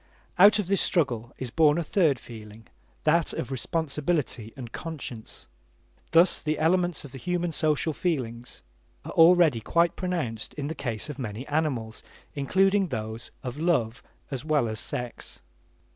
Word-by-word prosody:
Out 205 +3 +8
of 210 - 0
this 195 +2 +2
struggle 125 - +1
is 130 -3 -5
born 155 0 +4
a 170 - 0
third 155 -4 +2
feeling, 110 -1 -12 0.4
that 165 +1 +2
of 130 - -4
responsibility 145 -4 -1
and 120 -3 -8
conscience. 140 -9 -7 0.6
Thus 170 +2 +4
the 155 0 -1
elements 175 0 +1
of 140 - -11
the 135 - -9
human 175 +2 -1
social 155 0 +1
feelings 125 -9 -3 0.4
are - - -6
already 165 -7 +5
quite 170 +8 +2
pronounced 165 - -3
in 145 - -4
the 155 - -3
case 120 -8 -4
of 150 -2 -7
many 115 0 -5
animals, 140 -8 -1 0.3
including 190 +7 +2
those 110 -4 -5
of 130 +2 -5
love 125 -9 +1 0.3
as 135 -1 -4
well 150 -5 +1
as 110 -1 -3
sex. 125 -1 -5
150 Hz, 150 wpm, -27 LUFS, 120-170 Hz, 0.6 s, Out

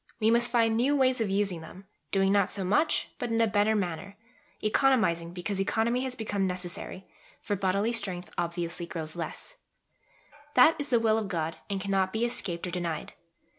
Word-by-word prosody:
We 220 0 +3
must 235 +1 +4
find 230 -2 +3
new 260 +6 +2
ways 260 -3 +3
of 215 - 0
using 195 -3 0
them, 180 +4 -12 0.3
doing 195 0 +3
not 200 -2 +3
so 195 - 0
much, 290 - +2
but 245 - -2
in 230 0 +1
a 230 - +5
better 210 0 +2
manner 195 0 -3 0.5
economising 215 -8 +2
because 180 +2 -3
economy 230 +5 +1
has 260 -1 -3
become 205 -4 -1
necessary, 180 +1 -5 0.3
for 205 - -2
bodily 200 +3 +1
strength 190 -6 -3
obviously 170 0 -3
grows 160 -2 -6
less: 175 - -6 1.0
that 255 +6 +7
is 290 - -3
the 240 - +4
will 220 -1 +3
of 215 - -3
God 165 -3 -2
and 200 -1 -1
cannot 195 -1 0
be 225 +2 +1
escaped 175 -8 -2
or 180 - -4
denied. 170 -3 -3
200 Hz, 180 wpm, -28 LUFS, 180-230 Hz, 1.0 s, that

